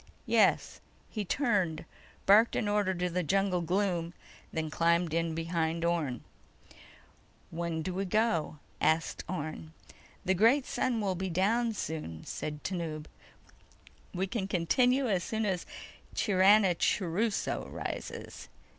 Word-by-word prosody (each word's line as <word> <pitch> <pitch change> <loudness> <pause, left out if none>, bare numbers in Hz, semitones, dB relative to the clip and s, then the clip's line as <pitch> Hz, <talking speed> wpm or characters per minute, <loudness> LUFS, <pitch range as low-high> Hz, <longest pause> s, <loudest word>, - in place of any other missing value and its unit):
"Yes." - - +2 0.3
He 215 - -2
turned, 195 - 0 0.4
barked 215 +4 +6
an 215 - 0
order 205 -2 +1
into 180 -1 0
the 180 +1 -1
jungle 190 +1 +1
gloom, 175 -1 -1 0.4
then 160 -1 -3
climbed 170 0 +2
in 165 -1 0
behind 165 0 -1
Orne. 155 -8 -1 1.3
"When 165 -1 -3
do 185 - -3
we 195 +2 -2
go?" 180 -6 +1 0.2
asked 160 +1 +1
Orne. 155 -2 -5 0.5
"The 190 - +3
great 230 +8 +4
sun 240 -3 -1
will 195 -2 0
be 190 +1 -3
down 225 +7 +1
soon," 150 - -5
said 150 -1 -5
Tanub. 165 -5 -3 1.1
"We 185 +1 -1
can 195 0 -3
continue 250 +9 +2
as 190 -5 +1
soon 220 +3 -2
as 185 -4 -2 0.5
Chiranachuruso 195 0 +2
rises." - - -6
180 Hz, 120 wpm, -30 LUFS, 165-205 Hz, 1.3 s, barked